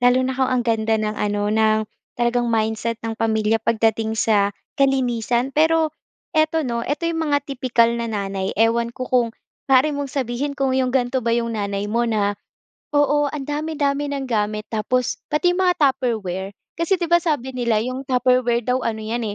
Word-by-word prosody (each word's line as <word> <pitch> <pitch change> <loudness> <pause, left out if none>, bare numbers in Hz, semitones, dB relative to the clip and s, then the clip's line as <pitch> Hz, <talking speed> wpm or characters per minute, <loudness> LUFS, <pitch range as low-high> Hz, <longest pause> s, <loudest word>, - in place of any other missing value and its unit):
Lalo 245 +1 +4
na 260 - -1
kung 260 0 0
ang 255 -1 +1
ganda 225 -1 +1
ng 215 -1 -2
ano, 205 0 -1
ng 220 0 +3 0.4
talagang 240 0 +1
mindset 220 0 0
ng 225 - -2
pamilya 220 0 +1
pagdating 225 0 +1
sa 205 -2 +2 0.3
kalinisan. 250 -2 +1
Pero 320 0 +3 0.4
ito, 315 0 +2
'no? 235 -2 -2
Ito 290 +7 -3
'yong 335 -1 -1
mga 290 - +3
tipikal 250 -4 +2
na 235 0 -3
nanay. 195 -3 -3
Ewan 230 +2 +2
ko 255 +1 -5
kung 250 -2 +2 0.4
maari 270 +3 +4
mong 285 -1 -3
sabihin 275 +1 -3
kung 270 -2 +1
'yong 260 -1 +1
ganito 255 0 +1
ba 230 -1 0
'yong 230 -1 -1
nanay 200 -2 -2
mo, 235 +2 0
na 205 -2 +1 0.6
oo, 290 0 +2
ang 290 -2 -5
dami-dami 290 -1 -1
ng 275 -1 -3
gamit, 215 -2 -1
tapos 245 +3 -1
pati 355 +4 +2
mga 360 -1 +2
Tupperware. 225 - 0 0.2
Kasi, 335 +3 +1
'di 345 - -1
ba, 345 +1 +4
sabi 265 -6 -1
nila 235 -3 +1
'yong 255 +4 -3
Tupperware 250 -2 +2
daw 250 0 +1
ano 220 -1 -2
'yan, 225 +2 -3
245 Hz, 175 wpm, -21 LUFS, 220-275 Hz, 0.6 s, Lalo